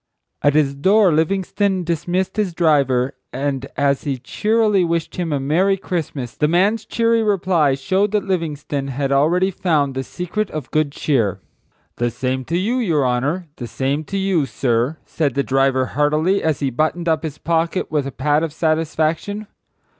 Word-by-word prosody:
At 145 0 +3
his 145 -3 +3
door 190 +5 +4
Livingstone 190 +3 0
dismissed 175 +3 -1
his 195 -5 -1
driver 140 -6 +2 0.2
and 135 0 -2
as 140 -1 +2
he 140 -3 -2
cheerily 210 - +1
wished 170 0 -2
him 175 -3 -2
a 145 - 0
merry 175 +8 +2
Christmas 150 - -4
the 150 - +1
man's 200 +7 +2
cheery 230 0 +2
reply 185 -9 +2
showed 190 +9 +1
that 210 - +1
Livingstone 150 -6 -2
had 135 +1 -2
already 170 +7 +3
found 150 -7 0
the 130 0 -3
secret 180 - -3
of 150 -4 -6
good 155 -2 +1
cheer. 120 - 0 0.6
"The 120 0 +1
same 130 +2 -3
to 165 +5 -1
you, 220 +8 0
your 165 - +1
honor; 135 +9 0
the 120 - -6
same 135 +5 -1
to 195 - -4
you, 190 -7 +1
sir," 120 +4 0
said 145 -6 -1
the 140 - +1
driver 135 -1 +2
heartily, 155 +7 +2
as 155 -4 0
he 135 -2 0
buttoned 155 +6 -1
up 160 -1 +2
his 155 -3 -5
pocket 170 +2 -1
with 145 -3 0
a - - -5
pat 145 +3 +1
of 165 -2 -2
satisfaction. 160 +5 -1
155 Hz, 170 wpm, -20 LUFS, 140-185 Hz, 0.6 s, door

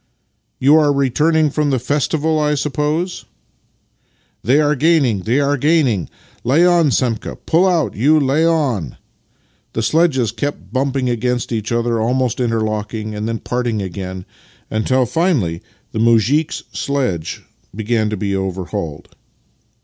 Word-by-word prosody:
" - - -49 0.2
You 145 +4 +5
are 150 -2 +4
returning 150 +3 +2
from 150 0 0
the 135 - +1
festival, 150 +5 0
I 150 0 +1
suppose? 150 +5 -2 0.4
" - - -45
" - - -42
They 130 +5 +3
are 150 -1 +3
gaining, 145 - +2
they 115 +9 0
are 145 0 +1
gaining! 135 - +1 0.3
Lay 145 +9 +4
on, 175 -4 +4
Semka! 120 -4 -1
Pull 175 +4 +3
out, 175 -4 +1
you! 150 +8 +4
Lay 140 +3 +1
on!" 135 - 0 0.8
The 115 - -2
sledges 135 -2 +2
kept 145 0 -5
bumping 135 -1 0
against 125 +1 -1
each 110 -1 -3
other, 115 -1 0
almost 125 +2 0
interlocking, 110 -2 -2
and 105 +1 -4
then 115 0 -2
parting 120 -2 -2
again, 95 -1 -6 0.5
until 125 +4 +1
finally 130 - 0 0.3
the 110 - -3
muzhik's 115 +7 +2
sledge 125 - -2 0.3
began 110 0 0
to 105 - -3
be 100 0 -2
overhauled. 90 -5 -4
125 Hz, 140 wpm, -18 LUFS, 110-150 Hz, 0.8 s, You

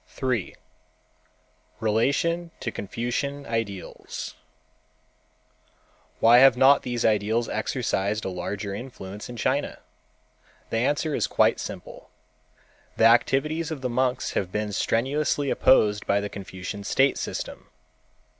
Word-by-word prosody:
3. 125 0 -2 1.2
Relation 140 +11 +1
to 115 - -3
Confucian 120 +8 -3
Ideals 115 -5 -5 1.9
Why 120 +2 +7
have 135 -1 +7
not 135 +2 +6
these 120 -1 -2
ideals 110 +2 +2
exercised 110 -2 -1
a - - -1
larger 100 +3 -4
influence 105 -3 -8
in 120 - -8
China? 135 +5 -1 0.9
The - - 0
answer 145 +5 0
is - - 0
quite - - +3
simple. - - -8 0.9
The 110 - +4
activities 135 +7 +3
of 155 -4 -5
the 125 -2 -2
monks 125 +1 0
have 90 -2 -2
been 105 +1 -2
strenuously 135 +6 0
opposed 105 -5 +3
by 100 - +3
the 100 0 -4
Confucian 95 +1 -7
state 135 +5 +2
system. - - -5
120 Hz, 115 wpm, -25 LUFS, 105-135 Hz, 1.9 s, Why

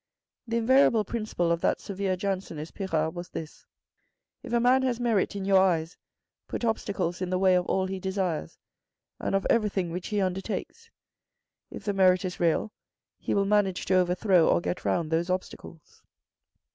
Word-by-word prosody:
The 230 +1 -1
invariable 235 -2 +4
principle 215 -6 -2
of 170 0 0
that - - +1
severe 195 -1 -2
Jansenist 185 -5 -4
Pirard 160 -5 -1
was 175 0 -7
this 160 -1 -8 0.4
— - - -52
"if - - -9
a 235 - +3
man 250 +2 +4
has 250 -2 -1
merit 225 -5 +1
in 195 -1 -4
your 195 -1 +5
eyes, 165 -3 +1 0.5
put - - -3
obstacles 190 -5 -2
in 185 - -2
the 185 - 0
way 185 0 +4
of 180 -1 +1
all 190 0 +1
he 190 0 -4
desires, 185 - -3 0.6
and - - -1
of 195 - 0
everything 200 -6 +1
which 180 +2 -5
he 210 -2 -1
undertakes. 195 - -3 0.8
If - - -9
the 205 0 -1
merit 185 -1 +4
is 180 - -5
real, 170 +5 +1 0.5
he - - -2
will 200 -1 +2
manage 200 -2 +1
to 190 - 0
overthrow 180 -1 +3
or - - +4
get 175 - -4
round 165 -3 0
those 165 +2 0
obstacles." 180 -3 -6
190 Hz, 175 wpm, -27 LUFS, 175-205 Hz, 0.8 s, your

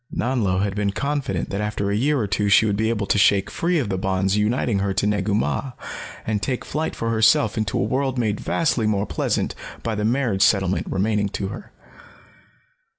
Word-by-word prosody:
Nanlo 105 -7 0
had 100 -1 -1
been 100 -1 -1
confident 140 - -2
that 100 - -2
after 105 -1 -2
a - - +1
year 145 +7 +2
or 110 - 0
two 100 +1 0
she 100 +3 +6
would 105 -2 +1
be 110 +2 0
able 105 -3 -1
to 100 - +2
shake 100 0 +3
free 175 +1 0
of 130 -9 -1
the 95 -2 -1
bonds 95 +1 0
uniting 105 0 +1
her 95 0 -1
to 100 - +1
Negu 105 0 0
Mah 125 +4 -1 0.5
and 105 -2 -1
take 125 +1 -2
flight 155 +2 -3
for 115 0 -2
herself 110 -1 +3
into 110 -3 -1
a - - +1
world 130 +4 -1
made 110 -4 0
vastly 130 -9 0
more 105 -1 +1
pleasant - - -1 0.3
by 115 - -1
the 105 0 -2
marriage 115 -4 +1
settlement 95 -2 +2
remaining 100 +1 0
to 95 0 -4
her. - - -9
105 Hz, 205 wpm, -22 LUFS, 100-115 Hz, 0.5 s, she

